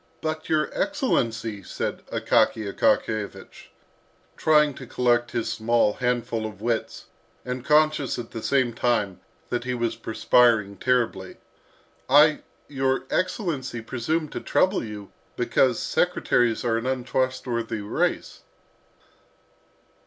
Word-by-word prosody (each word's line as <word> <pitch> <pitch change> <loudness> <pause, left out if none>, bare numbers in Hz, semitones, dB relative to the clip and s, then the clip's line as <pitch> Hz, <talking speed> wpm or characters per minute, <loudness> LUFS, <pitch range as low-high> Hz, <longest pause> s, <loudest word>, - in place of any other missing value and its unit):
"But, 155 0 -4
your 155 -1 +1
excellency," 115 - -1
said - - -4
Akaky 110 - +1
Akakiyevich, 110 -2 -1 0.7
trying 150 -2 +3
to - - -10
collect 120 -1 +1
his 120 -2 -2
small 115 -1 +2
handful 120 -2 -1
of 105 -3 -11
wits, 115 +1 -2 0.4
and 125 0 -4
conscious 150 -1 +2
at 120 -2 -7
the 115 - -6
same 130 -1 +1
time 110 -5 0 0.3
that 120 -1 -2
he 125 0 -2
was 120 -1 -1
perspiring 110 -2 +2
terribly, 115 -7 0 0.7
"I, 150 +2 +6 0.3
your 135 -2 0
excellency, 155 - -2
presumed 145 +7 -2
to - - -4
trouble 185 - +1
you 105 -3 -8 0.2
because - - +2
secretaries 120 -1 +1
are 115 -1 +2
an 120 - -5
untrustworthy 125 -3 -2
race." 100 - -2
120 Hz, 115 wpm, -25 LUFS, 115-135 Hz, 0.7 s, I